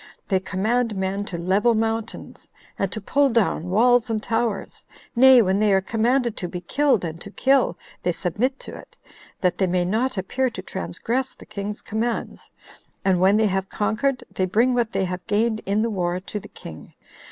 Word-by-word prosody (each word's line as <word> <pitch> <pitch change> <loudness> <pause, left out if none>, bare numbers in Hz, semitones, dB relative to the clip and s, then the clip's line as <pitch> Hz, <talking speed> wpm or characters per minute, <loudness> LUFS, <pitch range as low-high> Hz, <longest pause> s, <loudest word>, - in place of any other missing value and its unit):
They 190 -2 +3
command 220 +5 0
men 190 +1 -2
to 180 - -5
level 195 +7 +2
mountains, 225 0 -3 0.3
and 195 -1 0
to 215 - -3
pull 275 +7 +2
down 210 -7 +1
walls 240 +4 +4
and 225 - 0
towers; 225 -3 -2 0.3
nay, 255 0 +8
when 190 0 +1
they 210 -1 +3
are 190 - +5
commanded 235 +4 0
to 180 - -3
be 180 - -5
killed 275 -5 +1
and 165 +1 -6
to - - -8
kill, 265 -3 +2 0.2
they 180 - +1
submit 215 +11 -1
to - - -9
it, - - -14 0.4
that 180 -1 +1
they 190 - +3
may 180 0 +1
not 230 +6 0
appear 255 +8 0
to 225 - -7
transgress 235 +8 -3
the - - -14
king's 205 +1 -6
commands; 225 +2 -3 0.6
and 185 -2 +3
when 195 +3 +5
they 220 - +3
have 195 -1 -1
conquered, 245 +5 -1
they 185 - -1
bring 230 +7 +3
what 240 -2 0
they 190 - 0
have 180 0 -4
gained 215 +1 +1
in 205 +2 +1
the 230 - 0
war 180 -2 -1
to 200 +3 -6
the - - -12
king. 80 - -12
210 Hz, 190 wpm, -23 LUFS, 190-240 Hz, 0.6 s, nay